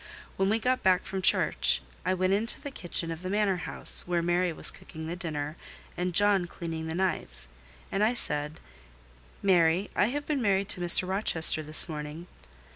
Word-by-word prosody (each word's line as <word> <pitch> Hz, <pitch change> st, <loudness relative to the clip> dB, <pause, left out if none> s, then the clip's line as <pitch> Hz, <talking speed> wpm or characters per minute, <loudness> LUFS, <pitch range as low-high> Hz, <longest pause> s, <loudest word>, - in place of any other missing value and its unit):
When 195 Hz, 0 st, 0 dB
we 220 Hz, -, +2 dB
got 250 Hz, +3 st, 0 dB
back 185 Hz, -1 st, +2 dB
from 190 Hz, -1 st, -4 dB
church, 185 Hz, -, +3 dB, 0.2 s
I 185 Hz, +1 st, 0 dB
went 185 Hz, +1 st, +1 dB
into 220 Hz, +4 st, +1 dB
the 285 Hz, -1 st, -8 dB
kitchen 175 Hz, -6 st, -2 dB
of 165 Hz, 0 st, -7 dB
the 185 Hz, -, -5 dB
manor 200 Hz, -2 st, +1 dB
house, -, -, +4 dB
where 175 Hz, -1 st, 0 dB
Mary 175 Hz, +1 st, +1 dB
was 160 Hz, -, -1 dB
cooking 160 Hz, 0 st, -10 dB
the 165 Hz, +2 st, -4 dB
dinner 155 Hz, -3 st, -5 dB, 0.4 s
and 180 Hz, +1 st, -2 dB
John 205 Hz, -3 st, +4 dB
cleaning 165 Hz, -2 st, -6 dB
the 160 Hz, -, -4 dB
knives, -, -, -2 dB, 0.4 s
and 195 Hz, +2 st, 0 dB
I 230 Hz, +3 st, +2 dB
said— 150 Hz, -6 st, -1 dB, 0.8 s
"Mary, 180 Hz, 0 st, +2 dB
I -, -, +3 dB
have 290 Hz, +4 st, -4 dB
been 290 Hz, -4 st, -1 dB
married 200 Hz, -3 st, +1 dB
to 180 Hz, -, 0 dB
Mr. 175 Hz, +1 st, +4 dB
Rochester 185 Hz, -5 st, +3 dB
this 155 Hz, +3 st, +3 dB
morning." 150 Hz, +1 st, -7 dB
180 Hz, 185 wpm, -28 LUFS, 160-200 Hz, 0.8 s, house